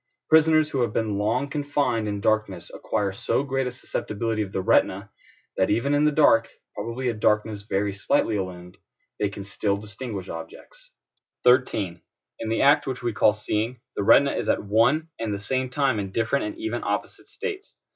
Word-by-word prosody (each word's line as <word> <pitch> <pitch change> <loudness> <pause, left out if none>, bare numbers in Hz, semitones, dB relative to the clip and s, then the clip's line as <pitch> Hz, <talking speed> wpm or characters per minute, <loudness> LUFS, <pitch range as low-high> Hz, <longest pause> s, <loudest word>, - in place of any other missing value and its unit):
Prisoners 155 -1 +5
who 135 - 0
have 115 -3 0
been 105 -3 -1
long 115 +7 0
confined 140 -6 -1
in 100 -1 -3
darkness 105 -5 0
acquire 105 -3 -2
so 100 +7 -1
great 135 -2 -1
a - - -3
susceptibility 115 -2 -3
of 100 -2 -4
the - - -2
retina, 95 +2 +2 0.5
that 95 - +2
even 120 +7 +1
in 145 +1 +3
the 150 - +4
dark 130 -7 +4 0.3
(probably 115 +4 -4
a 120 - +1
darkness 105 -1 +1
very 100 +1 0
slightly 100 +2 +1
illumined) 90 -2 -5 0.4
they 105 - +1
can 100 0 -8
still 100 0 -1
distinguish 105 -1 -7
objects. 85 - -10 0.5
13. 125 -8 +2 0.4
In 115 - -4
the 115 - +1
act 140 +2 +5
which 130 -2 -4
we 120 -2 -1
call 105 - +4
seeing, 110 +3 -2 0.2
the - - -1
retina 140 +7 +5
is - - -2
at - - +1
one 120 +10 +2
and 115 -2 -2
the - - -3
same 130 +6 -2
time 130 -3 +1
in 100 -1 -4
different 115 +6 0
and 320 +1 -5
even 335 0 -3
opposite - - -4
states. 410 -3 -6
115 Hz, 185 wpm, -25 LUFS, 100-135 Hz, 0.5 s, Prisoners